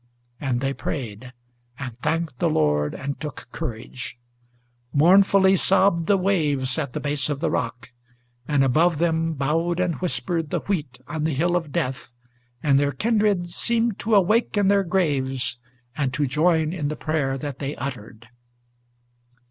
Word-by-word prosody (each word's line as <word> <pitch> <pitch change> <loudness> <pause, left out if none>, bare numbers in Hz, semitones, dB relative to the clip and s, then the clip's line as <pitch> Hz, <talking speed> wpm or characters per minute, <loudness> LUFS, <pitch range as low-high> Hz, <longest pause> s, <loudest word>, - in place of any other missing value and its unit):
and 130 -4 -1
they 135 0 0
prayed, 125 -4 -5 0.5
and 130 -5 -6
thanked 155 -2 -2
the - - +2
Lord 75 -1 +1
and 140 +1 -5
took 150 -3 -7
courage. 120 +2 -6 0.7
Mournfully 190 +5 +5
sobbed 190 -3 +3
the 200 - +4
waves 150 -8 +1
at 140 -5 -3
the - - -2
base 145 0 -1
of 145 -2 -2
the 165 - 0
rock, 120 -1 -3 0.6
and 145 -2 +3
above 160 +5 +3
them 165 0 +1
Bowed 165 +5 0
and 180 -2 +1
whispered 170 -3 -1
the - - -1
wheat 150 -10 -3
on 160 -2 -3
the 155 -2 0
hill 175 +5 +1
of 165 -4 -2
death, 130 -1 -3 0.5
and 140 -3 +4
their 145 0 +1
kindred 205 - +1
Seemed 230 +2 0
to 220 0 +1
awake 210 +3 +3
in 200 -1 +3
their 200 -1 +4
graves, 140 -8 0 0.4
and 135 -3 0
to 150 - +1
join 160 +3 +2
in 155 -6 -2
the 155 - -3
prayer 150 -5 -1
that 140 -2 -6
they 140 +1 -3
uttered. 115 -3 -7
150 Hz, 155 wpm, -23 LUFS, 135-175 Hz, 0.7 s, Mournfully